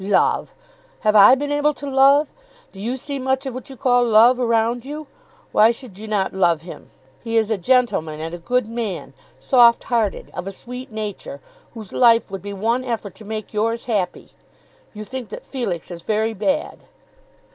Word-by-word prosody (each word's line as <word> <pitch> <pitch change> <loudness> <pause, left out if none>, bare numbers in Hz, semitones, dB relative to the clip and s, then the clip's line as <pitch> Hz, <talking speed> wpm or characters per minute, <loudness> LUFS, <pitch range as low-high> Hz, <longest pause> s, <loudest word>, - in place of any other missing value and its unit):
"Love! 200 +1 +1 0.5
Have 215 -2 +2
I 205 +5 +9
been 290 +2 -3
able 290 0 +1
to 285 - -8
love? 275 +2 +5 0.4
Do 195 - -13
you 240 +5 -2
see 280 +2 -5
much 265 +1 -1
of 265 - -4
what 255 +1 -8
you 265 - -10
call 245 -2 +3
love 235 +2 +5
around 230 0 +1
you? 300 +3 -7 0.5
Why 215 +1 +5
should 230 -4 -6
you 220 - -8
not 205 -3 -1
love 170 -4 +2
him? 175 - -11 0.3
He 230 -1 -1
is 220 0 +1
a 220 - +1
gentleman, 180 -9 +1
and 165 +1 -5
a 175 - -6
good 245 +6 0
man, 230 -4 -5 0.2
soft 240 -3 +4
hearted, 230 -5 -1
of 185 - -6
a - - -3
sweet 250 +5 -9
nature, 215 +5 -6 0.4
whose 215 -4 -9
life 230 -4 +4
would 195 -2 -5
be 205 - -7
one 230 +6 -1
effort 225 -5 -4
to 220 - -14
make 215 +1 -6
yours 230 +2 -1
happy. 200 -7 -2 0.6
You 210 - -6
think 250 0 -7
that - - -9
Felix 200 - -4
is 170 -1 -8
very 220 +3 -1
bad." 280 +9 -2
230 Hz, 190 wpm, -21 LUFS, 205-255 Hz, 0.6 s, I